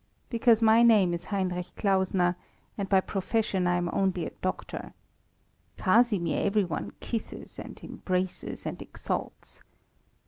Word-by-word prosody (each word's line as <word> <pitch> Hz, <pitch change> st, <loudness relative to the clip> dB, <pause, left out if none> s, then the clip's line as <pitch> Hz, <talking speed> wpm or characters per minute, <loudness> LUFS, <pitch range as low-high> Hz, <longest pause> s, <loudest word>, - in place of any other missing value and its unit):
Because 230 Hz, -1 st, +4 dB
my 225 Hz, +1 st, +6 dB
name 210 Hz, -7 st, +5 dB
is 170 Hz, 0 st, -4 dB
Heinrich 185 Hz, -3 st, -2 dB
Klausner, 190 Hz, -3 st, +2 dB, 0.4 s
and 195 Hz, -2 st, -4 dB
by 190 Hz, -1 st, +5 dB
profession 195 Hz, -1 st, -1 dB
I 175 Hz, -, +2 dB
am 175 Hz, 0 st, 0 dB
only 185 Hz, -3 st, +1 dB
a -, -, -5 dB
doctor. 185 Hz, -, -4 dB, 0.8 s
Casimir 205 Hz, -3 st, +2 dB
every 205 Hz, +1 st, +2 dB
one 170 Hz, -4 st, -4 dB
kisses 230 Hz, -2 st, -5 dB
and -, -, -9 dB
embraces 185 Hz, 0 st, -3 dB
and -, -, -4 dB
exalts. -, -, -6 dB
190 Hz, 130 wpm, -28 LUFS, 180-215 Hz, 0.8 s, my